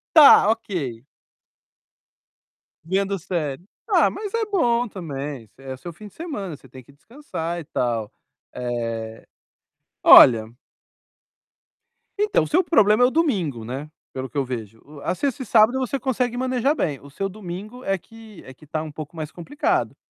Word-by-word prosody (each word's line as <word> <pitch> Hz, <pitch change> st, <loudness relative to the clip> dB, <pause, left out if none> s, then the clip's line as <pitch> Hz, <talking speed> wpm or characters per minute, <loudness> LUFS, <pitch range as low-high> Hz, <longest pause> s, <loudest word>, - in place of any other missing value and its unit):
Tá, 300 Hz, -9 st, +9 dB
ok. 165 Hz, -, -2 dB, 1.8 s
Vendo 195 Hz, +3 st, 0 dB
série. 160 Hz, -4 st, -3 dB, 0.2 s
Ah, -, -, +4 dB
mas 415 Hz, -2 st, -6 dB
é 460 Hz, -1 st, +1 dB
bom 245 Hz, -, +1 dB
também. 145 Hz, -, -6 dB
É 130 Hz, -1 st, -8 dB
seu 170 Hz, +6 st, -9 dB
fim 210 Hz, +6 st, -11 dB
de 205 Hz, -, -17 dB
semana, 205 Hz, -, -5 dB
você 135 Hz, -, -18 dB
tem 130 Hz, +1 st, -13 dB
que 130 Hz, -, -19 dB
descansar 170 Hz, -, -6 dB
e -, -, -7 dB
tal. 115 Hz, -7 st, -2 dB, 0.4 s
Eh, 115 Hz, -2 st, -4 dB, 0.8 s
olha 115 Hz, -2 st, +8 dB, 1.7 s
então 420 Hz, 0 st, +2 dB
o -, -, -4 dB
seu 360 Hz, +4 st, +3 dB
problema 220 Hz, -, +4 dB
é -, -, +7 dB
o -, -, -2 dB
domingo, 190 Hz, -, 0 dB
né, 135 Hz, +6 st, -6 dB, 0.2 s
pelo 130 Hz, 0 st, -5 dB
que -, -, -8 dB
eu 135 Hz, -, +1 dB
vejo. 115 Hz, -3 st, -7 dB, 0.2 s
A -, -, -1 dB
sexta 275 Hz, +4 st, -2 dB
e -, -, -10 dB
sábado 225 Hz, +4 st, +4 dB
você 265 Hz, +1 st, -2 dB
consegue 250 Hz, -2 st, -1 dB
manejar 255 Hz, +3 st, +1 dB
bem, 145 Hz, -, -2 dB
o 140 Hz, -, -13 dB
seu 195 Hz, +7 st, -3 dB
domingo 210 Hz, +5 st, -8 dB
é 195 Hz, -4 st, 0 dB
que 220 Hz, +1 st, -15 dB
é 130 Hz, -, -11 dB
que 150 Hz, +3 st, -19 dB
tá 155 Hz, +1 st, -2 dB
um 155 Hz, -, -7 dB
pouco 155 Hz, +2 st, -9 dB
mais 155 Hz, -2 st, -5 dB
complicado, 265 Hz, -, -1 dB
175 Hz, 160 wpm, -23 LUFS, -, 1.8 s, Tá